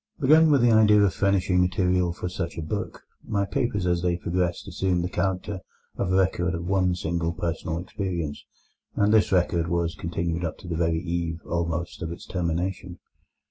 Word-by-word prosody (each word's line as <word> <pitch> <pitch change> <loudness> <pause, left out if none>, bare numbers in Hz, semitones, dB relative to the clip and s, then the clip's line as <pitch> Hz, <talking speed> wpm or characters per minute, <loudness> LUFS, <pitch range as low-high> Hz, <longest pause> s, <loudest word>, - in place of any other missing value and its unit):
Begun 155 +4 +6
with 140 -4 +4
the 120 - +5
idea 105 -1 +6
of 95 -2 +2
furnishing 95 -2 +2
material 90 -1 +1
for 90 - -5
such 90 -1 -4
a 80 - -3
book, 80 - -4 0.2
my 100 -1 -1
papers 105 -2 -1
as 90 -1 +1
they 90 -1 +1
progressed 90 0 -2
assumed 90 -2 0
the 90 - -2
character 95 +2 -2 0.4
of 90 - -1
a - - +3
record 90 -2 +1
of 85 +1 -5
one 90 -1 +2
single 85 -1 -2
personal 85 -1 -3
experience, 90 -4 -4 0.5
and 105 +1 +3
this 110 - +4
record 85 -2 +2
was 85 -1 0
continued 85 +2 -3
up 80 - -3
to - - -12
the 85 - -2
very 80 0 +1
eve, 85 -1 -2
almost, 85 +1 -2
of 80 -1 -3
its 85 - -8
termination. 90 +1 -3
90 Hz, 180 wpm, -25 LUFS, 85-95 Hz, 0.5 s, Begun